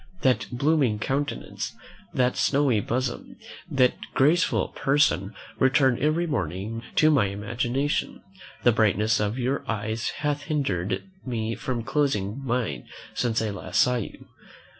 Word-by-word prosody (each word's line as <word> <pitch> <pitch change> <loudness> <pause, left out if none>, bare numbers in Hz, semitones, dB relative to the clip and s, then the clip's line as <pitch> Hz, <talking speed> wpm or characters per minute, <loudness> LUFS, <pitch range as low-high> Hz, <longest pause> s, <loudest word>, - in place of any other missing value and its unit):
That 130 -1 +2
blooming 135 -3 +2
countenance, 135 +6 -3 0.4
that 125 -1 +1
snowy 140 -5 +2
bosom, 120 +3 -3 0.3
that 130 -2 +4 0.2
graceful 160 +6 +3
person 135 -8 +1 0.2
return 130 -2 +4
every 155 +4 +2
moment 110 - -3
to 155 0 +5
my 130 -9 +4
imagination; 120 +8 -2 0.4
the 120 - +6
brightness 110 0 +2
of 105 +3 -1
your 130 +2 -1
eyes 110 +1 -2
hath 145 -1 -1
hindered 100 - -1 0.2
me 115 -3 -2
from 120 -1 -3
closing 130 -3 0
mine 115 - -2 0.3
since 115 -2 0
I 110 - -1
last 95 0 -2
saw 125 0 +4
you. 115 - -7
120 Hz, 125 wpm, -26 LUFS, 105-140 Hz, 0.4 s, the